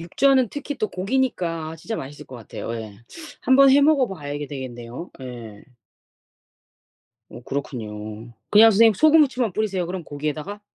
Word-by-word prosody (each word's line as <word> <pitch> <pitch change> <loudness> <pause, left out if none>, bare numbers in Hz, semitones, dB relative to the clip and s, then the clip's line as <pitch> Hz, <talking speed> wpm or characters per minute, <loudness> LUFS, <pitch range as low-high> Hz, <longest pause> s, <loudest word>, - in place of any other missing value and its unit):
육전은 255 +8 +2
특히 290 0 -5
또 215 - -1
고기니까 185 -7 -2
아 160 - -8
진짜 220 +8 -5
맛있을 140 +2 -8
것 130 - -10
같아요 115 0 -7
예. 110 -3 -8 0.4
한번 270 +2 +6
해 280 +2 +6
먹어봐야 240 - +1
되겠네요 130 +2 -8
예. 120 -5 -9 1.6
어 120 - -11
그렇군요. 110 -5 -6 0.2
그냥 220 +2 +8
선생님 225 +1 +5
소금 310 +7 +6
후추만 250 -7 0
뿌리세요 195 -3 -1
그럼 180 -1 -5
고기에다가? 155 +7 -5
175 Hz, 330 characters per minute, -23 LUFS, -, 1.6 s, 그냥